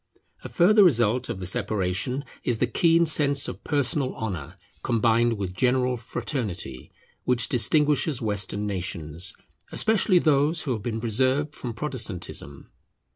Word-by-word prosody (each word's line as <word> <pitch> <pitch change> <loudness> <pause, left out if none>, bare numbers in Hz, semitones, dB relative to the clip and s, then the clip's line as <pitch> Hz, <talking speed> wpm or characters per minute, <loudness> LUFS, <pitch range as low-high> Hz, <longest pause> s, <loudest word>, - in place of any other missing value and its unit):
A - - -7
further 205 +4 +5
result 120 - +3
of - - -3
the 95 - -6
separation 105 +5 -2 0.2
is 120 - 0
the 125 - +2
keen 165 +6 +3
sense 140 -3 +3
of - - -7
personal 140 -2 -1
honour, 90 -6 -5 0.2
combined 115 0 +2
with 95 -2 -4
general 125 +5 +1
fraternity, 105 - -5 0.3
which 125 -3 +1
distinguishes 145 +3 +2
Western 105 -2 -2
nations, 85 -4 -3 0.4
especially 215 -3 +2
those 155 0 +2
who 135 - -2
have 110 -4 -2
been 115 0 -3
preserved 130 +6 0
from 120 -3 -6
Protestantism. 110 - -5
120 Hz, 130 wpm, -25 LUFS, 100-145 Hz, 0.4 s, further